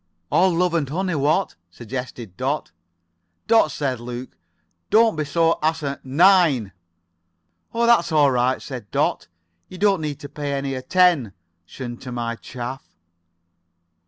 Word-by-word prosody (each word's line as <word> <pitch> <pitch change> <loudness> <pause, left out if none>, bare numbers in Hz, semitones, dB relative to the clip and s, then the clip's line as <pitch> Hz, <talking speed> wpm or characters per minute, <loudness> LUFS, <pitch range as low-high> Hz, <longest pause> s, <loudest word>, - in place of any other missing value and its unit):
"All 185 +1 +4
love 175 0 +1
and 155 -5 0
honey, 185 +4 -1
what?" 155 +6 +1 0.2
suggested 120 0 -7
Dot. 135 +6 -2 0.7
"Dot," 225 -7 +4
said 135 -5 -2
Luke, 120 +2 -7 0.5
"don't 225 -2 +4
be 155 - -1 0.4
asi— 155 -3 -1
9." 150 - +4 1.0
"Oh, 235 0 +2
that's 235 -9 +4
all 145 -3 +4
right," 125 +1 +1
said 125 -7 -8
Dot - - 0 0.4
"You 185 - -10
don't 195 -2 +2
need 150 -2 -4
to 145 - -7
pay 145 0 -4
any 135 0 -2
at— 130 0 -8
10 175 - +3 0.3
tion 120 -2 -7
to 125 - -9
my 120 -1 -3
chaff." 125 +3 -7
140 Hz, 135 wpm, -22 LUFS, 125-175 Hz, 1.0 s, All